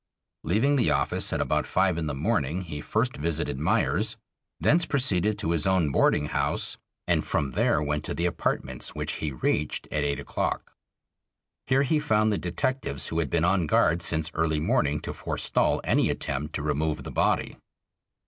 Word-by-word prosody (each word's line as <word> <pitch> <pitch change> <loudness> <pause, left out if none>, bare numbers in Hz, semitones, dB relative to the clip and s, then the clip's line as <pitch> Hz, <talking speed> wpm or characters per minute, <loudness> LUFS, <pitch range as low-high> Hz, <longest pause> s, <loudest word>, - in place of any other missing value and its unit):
Leaving 115 - +2
the 120 - +3
office 70 -3 +1
at - - -1
about - - 0
five 95 -1 +2
in 80 -2 -2
the 75 - -3
morning 75 +5 0
he 75 -5 -6
first 115 - -1
visited 75 -3 -2
Meyers, 80 - +1 0.4
thence 170 +3 +3
proceeded 105 - +2
to 85 -5 -1
his 85 -1 +1
own 90 -6 +2
boarding 75 - +3
house, - - -1 0.3
and - - +2
from 70 -2 -1
there 75 - +2
went 75 0 -1
to - - -3
the 85 - -1
apartments, 65 -7 -2
which - - -3
he 75 - -1
reached 70 +3 -1
at 75 -1 0
eight 70 0 -1
o'clock. - - -3 0.9
Here 135 +2 +3
he 150 +3 +2
found 110 -6 +2
the 100 - -1
detectives 90 - -2
who 80 - -1
had 80 -5 -1
been 85 +3 +1
on 90 -2 +2
guard 80 +3 +3
since 80 -1 -1
early 80 -1 +1
morning 80 - +1
to - - -5
forestall - - 0
any - - +2
attempt 75 +3 -3
to 70 - -2
remove 75 +1 -1
the - - -7
body. - - 0
80 Hz, 175 wpm, -26 LUFS, 75-100 Hz, 0.9 s, the